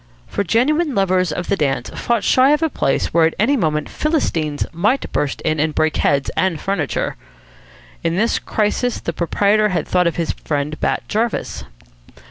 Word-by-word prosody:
For 200 - -2
genuine 285 - +1
lovers 185 -3 +2
of 175 +4 -3
the 200 - +2
dance 135 -7 -1
fought 235 -2 -1
shy 265 +3 +4
of 300 +2 +1
a 320 - +1
place 135 - 0
where 165 -1 +5
at 160 - -4
any 245 +8 +3
moment 155 - 0
Philistines 165 - -1
might 215 +11 0
burst 145 -1 -1
in 155 0 0
and 155 0 0
break 155 0 +1
heads 140 -1 +1
and 185 -4 0
furniture. 185 -8 -2 0.9
In 165 0 0
this 225 +5 +1
crisis 220 +3 -1
the 170 - -4
proprietor 205 +6 +2
thought 180 -1 +1
of 170 - -1
his 170 -2 -1
friend 150 0 -3
Bat - - 0
Jarvis. 220 - -2
185 Hz, 170 wpm, -19 LUFS, 155-230 Hz, 0.9 s, where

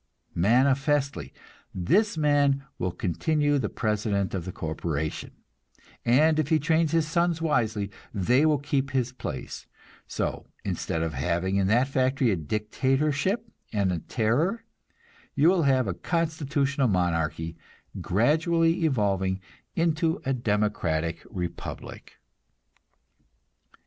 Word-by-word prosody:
Manifestly, 135 - +2 0.4
this 195 - +2
man 145 -2 +3 0.2
will 90 - -1
continue 145 - 0
the 105 - -1
president 105 -3 -1
of 90 -3 -3
the 95 - -4
corporation, 80 -2 -3 0.7
and 155 +6 +4
if 155 - +1
he 160 - +4
trains 160 +1 +1
his 165 -2 +2
sons 170 +1 +1
wisely, 110 -10 0 0.2
they 120 +8 +2
will 155 -1 +4
keep 140 -1 -1
his 130 -2 0
place; 125 - -6 0.4
so, - - -3 0.2
instead 80 - -2
of 80 -1 -2
having 85 +7 0
in 95 -1 +2
that 120 +6 +3
factory 130 -2 +1
a - - +2
dictatorship 135 - 0 0.2
and 100 -4 +1
a 85 - -1
terror, 130 - 0 0.7
you 150 +4 +5
will 180 -3 +3
have 130 -2 +3
a 95 - -1
constitutional 145 - 0
monarchy, 85 -4 0 0.5
gradually 165 - +2
evolving 100 - +1 0.4
into 165 0 +1
a 135 - +1
democratic 105 -8 -1
republic. 90 -2 -6
130 Hz, 115 wpm, -26 LUFS, 95-155 Hz, 0.7 s, you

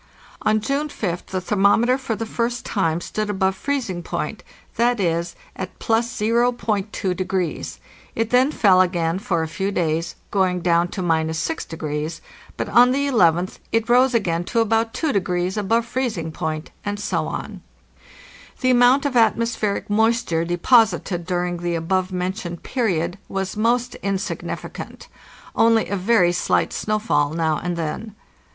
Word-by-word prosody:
On 215 0 +2
June 280 +7 -1
5th 180 -10 -4
the 190 - -2
thermometer 205 +6 +3
for 260 -4 -3
the 225 - -4
first 235 +2 -2
time 165 -5 0
stood 215 +3 -3
above 190 -1 +1
freezing 235 -8 -2
point—viz., 175 -4 -2 0.2
at 185 -1 -6
+0.2°. 215 -6 -1 0.4
It 225 0 0
then 255 +3 +4
fell 190 -9 +5
again 175 -1 0
for 170 -5 -1
a - - -3
few 190 +5 -2
days, 165 -2 -1 0.2
soing 185 -3 +1
down 170 0 +3
to 185 +1 -5
—6°; 160 - -2 0.4
but - - -2
on 245 +3 +6
the 275 +2 +1
11th 180 - +2
it 225 0 +1
rose 250 +1 +4
again 175 -6 +1
to 230 - 0
about 225 0 +2
2° 185 - 0
above 225 +3 +1
freezing 235 -10 -2
point, 155 0 -4
and 205 0 -3
so 205 - -1
on. - - -6 1.0
The 255 -1 +3
amount 250 +3 +5
of 280 -3 -1
atmospheric 225 -2 +1
moisture 220 -5 +1
deposited 175 -1 +2
during 175 -1 -1
the 175 0 -2
above 185 +3 0
mentioned 180 -1 -4
period 190 -7 -1
was 195 -1 -3
most 240 +3 +1
insignificant; 195 0 -4 0.5
only 225 -1 +3
a 200 - -1
very 190 -2 +3
slight 175 - +1
snowfall 210 -9 0
now 160 -2 0
and 175 0 -3
then. 195 +7 -4
195 Hz, 135 wpm, -22 LUFS, 175-230 Hz, 1.0 s, on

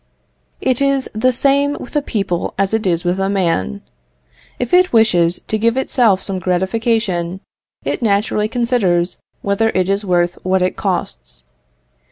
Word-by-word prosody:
It 255 0 0
is 275 -1 +1
the 225 +4 +2
same 280 +3 +2
with 250 - -10
a 295 - +3
people 195 -9 -2
as 195 +1 0
it 220 -3 0
is 170 -1 0
with 180 +1 0
a 195 0 0
man. 165 - -1 0.7
If 245 +4 -4
it 365 0 +5
wishes 180 -7 +3
to 215 - -1
give 230 +3 +1
itself 235 -7 +2
some 190 -2 -2
gratification, 190 -1 -1 0.5
it - - -2
naturally 210 -1 +1
considers 215 -8 0 0.2
whether 200 +3 +1
it 185 -1 +1
is 200 +2 0
worth 175 -2 0
what 185 0 +1
it 185 - 0
costs. - - -4
200 Hz, 155 wpm, -17 LUFS, 180-235 Hz, 0.7 s, it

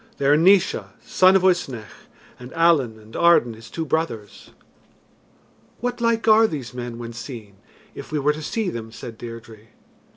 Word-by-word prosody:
"They 140 - -3
are 145 +2 +5
Naois, 185 +4 +3 0.2
son 185 +1 +4
of 190 - +3
Uisnech, 135 - -1 0.3
and 125 +1 -11
Allen 160 -9 +2
and 110 +1 -16
Arden 170 -9 +4
his 115 +1 -13
two 165 - -4
brothers." 115 - -4 1.3
"What 245 +1 -3
like 230 -1 +1
are 220 +1 +6
these 140 - -6
men 120 -1 -6
when 120 0 -7
seen, 115 -5 -9 0.4
if - - -10
we 155 - -1
were 145 +1 +2
to 155 - -8
see 205 +4 -2
them?" 115 -1 -7
said 115 0 -9
Deirdre. 115 -2 -10
135 Hz, 165 wpm, -22 LUFS, 115-175 Hz, 1.3 s, are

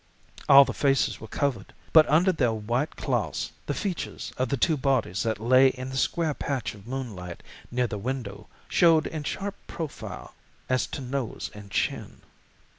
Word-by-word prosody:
All 140 0 +10
the 130 - -4
faces 135 -2 +1
were 110 - -8
covered, 125 -5 -2 0.2
but 160 -1 +7
under 170 +6 +5
their 130 -9 +1
white 120 +7 -2
cloths - - -2 0.2
the - - -1
features 190 -6 -4
of 130 -1 -1
the 140 - 0
two 160 +6 +3
bodies 130 -9 0
that 110 -2 -1
lay 130 +4 +6
in 130 0 -3
the - - -6
square 155 +4 +1
patch 135 -5 -3
of 105 +1 -14
moonlight 110 -10 -6 0.3
near 125 +1 +1
the 105 -3 -4
window 120 -3 -5 0.2
showed 165 -2 +4
in 155 -2 -4
sharp 200 +7 -3
profile 150 - -7 0.3
as 130 0 +1
to - - -6
nose 130 -2 -4
and 105 -1 -11
chin. - - -2
130 Hz, 170 wpm, -27 LUFS, 115-145 Hz, 0.3 s, All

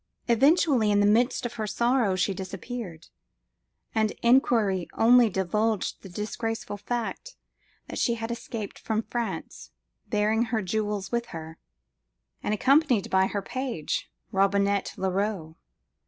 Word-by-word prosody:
Suddenly, 265 -1 +4
in 205 0 +3
the 205 - +4
midst 240 +5 +2
of 240 - -3
her 215 -2 -3
sorrow, 235 -2 +2
she 185 +2 +1
disappeared; 190 -1 -7 0.8
and 220 -2 +1
inquiry 225 -7 +3
only 240 0 +5
divulged 210 +3 -1
the 195 - -10
disgraceful 225 +3 -4
fact, 240 - -4 0.5
that - - -5
she 235 - +2
had 225 0 -4
escaped 230 -3 -6
from 220 0 -1
France, 220 - -5 0.4
bearing 215 +2 +2
her 225 -2 -1
jewels 205 0 -2
with 235 0 -1
her, 160 -2 -8 0.8
and - - -2
accompanied 260 - +3
by 190 0 +4
her 200 0 -3
page, 245 - -3 0.2
Robinet 200 0 +1
Leroux. 190 -4 -2
215 Hz, 125 wpm, -27 LUFS, 195-235 Hz, 0.8 s, only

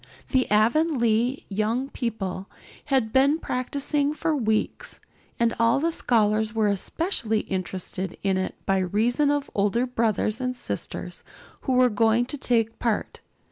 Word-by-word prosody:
The 260 -2 +2
Avonlea 235 +1 +2
young 220 +6 -1
people 195 -7 -4 0.4
had 260 -6 +1
been 275 +3 +4
practicing 285 +2 -1
for 320 0 0
weeks, 220 -5 -1 0.4
and 235 -1 +2
all 230 +3 +4
the 330 +3 +1
scholars 220 -5 +1
were 215 -2 +2
especially 220 - -1
interested 185 -1 -4
in 195 -1 +2
it 185 0 -2
by 195 0 +2
reason 225 +10 +1
of 290 -1 -1
older 210 +5 +1
brothers 225 -2 0
and 255 0 -1
sisters 245 - -5 0.4
who 260 - +2
were 250 -1 +4
going 225 +3 +3
to 290 - -5
take 230 -3 0
part. 230 -3 -2
230 Hz, 140 wpm, -25 LUFS, 210-265 Hz, 0.4 s, been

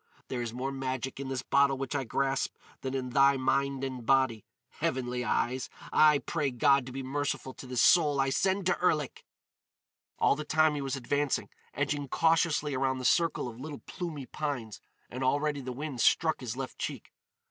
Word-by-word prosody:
There 125 -2 -2
is 120 -2 -3
more 130 +3 -3
magic 130 -1 -4
in 140 - -4
this 130 -2 -3
bottle 140 0 +3
which 135 -1 -4
I 140 -2 -1
grasp 135 +3 -1 0.3
than 135 0 -3
in 130 -1 -3
thy 140 +1 +5
mind 135 +1 0
and 130 -2 -4
body. 130 -3 +2 0.4
Heavenly 125 -1 -1
Eyes! 125 +2 0 0.2
I 150 -1 +6
pray 150 0 -1
God 130 +1 +3
to - - -7
be 135 +1 -5
merciful 140 0 -2
to 130 - -11
this 125 -2 +1
soul 150 -5 +5
I 135 0 +2
send 190 +5 +1
to 180 - +2
Erlik!" 150 -6 0 0.9
All - - +3
the 150 - -4
time 155 +1 +3
he 145 - -3
was 135 0 -2
advancing, 140 +2 -1 0.3
edging 145 0 -1
cautiously 160 -1 +2
around 130 0 0
the 130 - -5
circle 165 +1 +2
of 120 -1 -9
little 145 +1 -7
plumy 165 -7 -5
pines; 125 -6 -4 0.3
and 130 +2 -5
already 145 +2 +1
the 130 -1 -5
wind 135 -1 -4
struck 160 -1 +3
his 125 -1 -5
left 135 -1 -6
cheek. - - -5
135 Hz, 185 wpm, -30 LUFS, 130-145 Hz, 0.9 s, I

